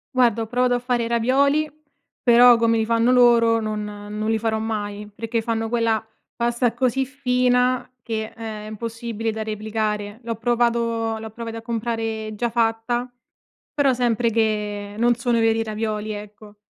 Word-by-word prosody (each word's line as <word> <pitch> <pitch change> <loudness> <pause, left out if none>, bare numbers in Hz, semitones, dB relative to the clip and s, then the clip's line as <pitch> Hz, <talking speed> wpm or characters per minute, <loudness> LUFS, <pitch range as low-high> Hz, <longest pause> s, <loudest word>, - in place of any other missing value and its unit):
Guarda, 235 -3 +3
ho - - -7
provato 245 +1 +1
a - - 0
fare 245 -1 0
i - - -2
ravioli 280 +6 +2 0.5
però 245 0 +7
come 230 0 +2
li 220 - +1
fanno 230 +2 +2
loro 235 -2 +5
non 215 -1 -3
non 210 +1 -5
li 225 0 +1
farò 220 0 0
mai, 210 -2 -4
perché 225 +2 -2
fanno 225 0 -2
quella 230 -1 +1 0.3
pasta 235 0 +1
così 255 +2 +1
fina 250 -1 +1
che, 220 -1 -4
ehm, 220 -2 -6
è - - -8
impossibile 230 0 -4
da 220 0 -4
replicare. 215 0 -3
L'ho 230 0 -3
provato 230 -1 0
l'ho 220 0 -7
provati 230 0 -6
a 225 - -7
comprare 225 -1 -3
già 235 +3 -1
fatta, 235 +2 0 0.6
però 285 -2 +3
sempre 240 -1 +1
che 210 -2 -1
non 240 +2 +4
sono 240 0 0
i - - +2
veri 225 0 +2
ravioli, 215 -1 -3
ecco. 210 0 -10
230 Hz, 165 wpm, -22 LUFS, 220-240 Hz, 0.6 s, però